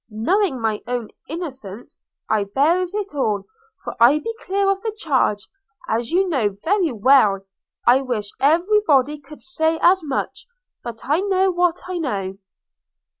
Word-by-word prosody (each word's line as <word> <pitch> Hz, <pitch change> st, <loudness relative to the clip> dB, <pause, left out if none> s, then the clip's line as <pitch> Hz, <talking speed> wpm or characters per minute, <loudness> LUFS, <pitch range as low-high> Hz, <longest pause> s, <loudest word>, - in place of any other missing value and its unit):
Knowing 265 Hz, -, 0 dB
my 220 Hz, -2 st, -1 dB
own 245 Hz, -3 st, -3 dB, 0.2 s
innocence, 265 Hz, -, -8 dB, 0.3 s
I 215 Hz, -2 st, +1 dB
bears 335 Hz, -, +1 dB
it 405 Hz, -5 st, -4 dB
all; 215 Hz, -8 st, -1 dB, 0.4 s
for -, -, -6 dB
I 240 Hz, +6 st, +6 dB
be 455 Hz, +9 st, -4 dB
clear 395 Hz, +1 st, 0 dB
of 390 Hz, 0 st, +1 dB
the 445 Hz, -, -2 dB
charge, 260 Hz, -, 0 dB, 0.4 s
as 230 Hz, +2 st, -1 dB
you 375 Hz, +3 st, +2 dB
know 230 Hz, -, 0 dB
very 365 Hz, -3 st, +1 dB
well: 215 Hz, -4 st, +4 dB, 0.4 s
I 250 Hz, +3 st, +5 dB
wish 235 Hz, -6 st, -3 dB
every 345 Hz, +9 st, +3 dB
body 290 Hz, +1 st, +3 dB
could 295 Hz, +2 st, -14 dB
say 320 Hz, -2 st, 0 dB
as 365 Hz, 0 st, +4 dB
much; 280 Hz, -, -4 dB, 0.4 s
but 235 Hz, -2 st, -7 dB
I 295 Hz, +5 st, +1 dB
know 385 Hz, -1 st, +2 dB
what 355 Hz, -1 st, +1 dB
I 365 Hz, -1 st, -3 dB
know.' 195 Hz, -, -3 dB
290 Hz, 155 wpm, -21 LUFS, 230-360 Hz, 0.4 s, I